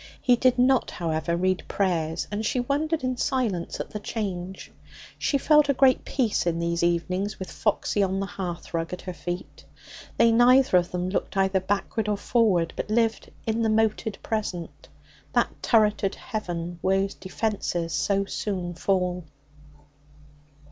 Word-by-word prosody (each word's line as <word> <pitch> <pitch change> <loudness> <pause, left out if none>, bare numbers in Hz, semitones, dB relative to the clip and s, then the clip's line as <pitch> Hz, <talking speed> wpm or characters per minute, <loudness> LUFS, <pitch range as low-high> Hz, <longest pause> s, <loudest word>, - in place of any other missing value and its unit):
He 250 -3 +4
did 250 +1 +3
not, 255 +1 +3
however, 170 0 -2
read 185 +1 +1
prayers, 165 -4 -1
and 210 +1 -2
she 240 +3 0
wondered 295 +5 0
in 255 -1 -1
silence 240 -11 -1
at - - -5
the 210 - -4
change. 190 -4 -5 0.5
She 280 - +1
felt 300 +1 +4
a 280 - +3
great 260 0 +4
peace 230 -9 0
in 165 -1 +1
these 170 0 -1
evenings, 180 +4 0
with 190 - -7
Foxy 210 -1 0
on 190 0 +1
the 195 - -1
hearthrug 175 -3 -4
at 180 - -6
her 185 - -5
feet. 175 +2 -6 0.5
They 230 0 +5
neither 245 0 +5
of 175 0 -4
them 180 0 -2
looked 195 - -2
either 190 0 +3
backward 205 +3 -1
or 205 - +1
forward, 195 -8 +2
but - - -4
lived 225 0 +1 0.2
in 225 +1 0
the 225 - +2
moated 220 -1 +1
present, 195 -6 -4 0.5
that - - 0
turreted 210 -3 +2
heaven 175 -7 -5
whose 195 +1 +1
defences 185 -5 -2
so 195 +7 +1
soon 185 -3 -3
fall. 180 -1 0
195 Hz, 155 wpm, -26 LUFS, 175-225 Hz, 0.5 s, They